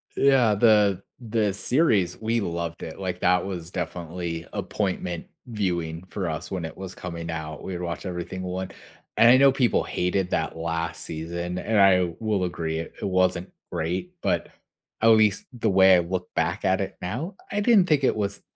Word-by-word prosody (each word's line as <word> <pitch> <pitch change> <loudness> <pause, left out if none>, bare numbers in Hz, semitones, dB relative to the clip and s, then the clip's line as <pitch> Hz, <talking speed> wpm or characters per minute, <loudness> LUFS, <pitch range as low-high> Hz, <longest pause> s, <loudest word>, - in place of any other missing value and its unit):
yeah, 130 -6 +4
the 105 -3 +4 0.2
the 110 -3 0
series, 105 - +2
we 115 +1 0
loved 85 -2 -4
it, 80 - -7
like, 90 -2 -3
that 90 0 +3
was 90 -3 -5
definitely 85 -2 -4
appointment 90 -4 -3 0.2
viewing 90 -7 -2
for 90 0 -3
us 80 +2 -5
when 90 -3 -3
it 80 - -8
was 95 -1 -7
coming 85 -2 -6
out, 80 -1 -6
we 95 - -5
had 90 - -4
watched 85 +2 -4
everything 90 0 -5
one 95 +1 -4 0.5
and 115 - +8
I 130 - +7
know 135 +1 +6
people 130 -3 +2
hated 90 +1 -1
that 80 - -1
last 85 +1 -3
season 85 +2 -4
and 105 +4 +1
I 90 -3 +5
will 105 -4 0
agree 80 -3 -2
it 80 - -7
it - - -2
wasn't 95 -1 +1 0.2
great, 90 - -3
but - - 0 0.5
at 110 - +4
least 110 -3 +4
the 115 -2 0
way 95 0 +7
I - - +5
look 90 +1 -3
back - - 0
at - - +2
it - - -5
now, 125 - -4 0.2
I 205 - 0
didn't 205 -4 +5
think 150 -3 +3
it - - +3
was 100 -1 -2
90 Hz, 185 wpm, -25 LUFS, 85-105 Hz, 0.5 s, and